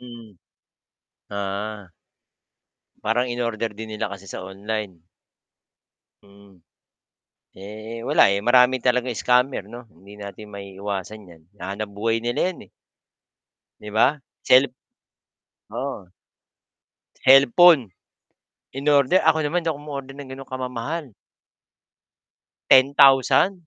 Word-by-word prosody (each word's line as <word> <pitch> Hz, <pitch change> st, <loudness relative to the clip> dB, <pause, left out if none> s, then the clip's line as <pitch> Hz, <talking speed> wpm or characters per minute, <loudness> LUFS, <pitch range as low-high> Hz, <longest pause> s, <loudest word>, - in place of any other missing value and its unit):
Mm, 115 Hz, -5 st, -13 dB, 0.9 s
ah. 100 Hz, -1 st, -5 dB, 1.1 s
Parang 120 Hz, +3 st, 0 dB
in-order 115 Hz, -2 st, -3 dB
din 110 Hz, 0 st, -7 dB
nila 105 Hz, -, -3 dB
kasi 100 Hz, -1 st, -10 dB
sa 95 Hz, -, -8 dB
online. 95 Hz, -2 st, -6 dB, 1.2 s
Mm. 100 Hz, -2 st, -20 dB, 0.9 s
Eh, 110 Hz, +4 st, -9 dB
wala -, -, +5 dB
eh, 100 Hz, -, +1 dB
marami 125 Hz, +4 st, +4 dB
talagang 125 Hz, 0 st, 0 dB
scammer 125 Hz, -4 st, +1 dB
'no, 120 Hz, 0 st, -12 dB
hindi 95 Hz, +5 st, -16 dB
natin 105 Hz, +1 st, -10 dB
maiiwasan 100 Hz, +1 st, -7 dB
'yan, 85 Hz, -3 st, -17 dB, 0.2 s
hanap 100 Hz, +3 st, -5 dB
buhay 115 Hz, +3 st, -2 dB
nila 120 Hz, +6 st, 0 dB
'yan, -, -, -15 dB, 1.1 s
'di 105 Hz, -, -8 dB
ba? 130 Hz, +7 st, +2 dB, 0.2 s
Cellp 130 Hz, +2 st, +5 dB, 1.0 s
oo. 130 Hz, -10 st, -6 dB, 1.1 s
cellphone, 135 Hz, -, +6 dB, 0.8 s
in-order, 140 Hz, +4 st, +3 dB
ako 160 Hz, 0 st, +2 dB
naman 165 Hz, +4 st, 0 dB
hindi 165 Hz, -, -4 dB
ako 145 Hz, -, -11 dB
um-order 140 Hz, -2 st, -7 dB
ng 140 Hz, -2 st, -10 dB
ganong 135 Hz, 0 st, -10 dB
kamamahal. 130 Hz, +3 st, -5 dB, 1.6 s
10,000, 135 Hz, +6 st, +5 dB
115 Hz, 100 wpm, -22 LUFS, 100-130 Hz, 1.6 s, cellphone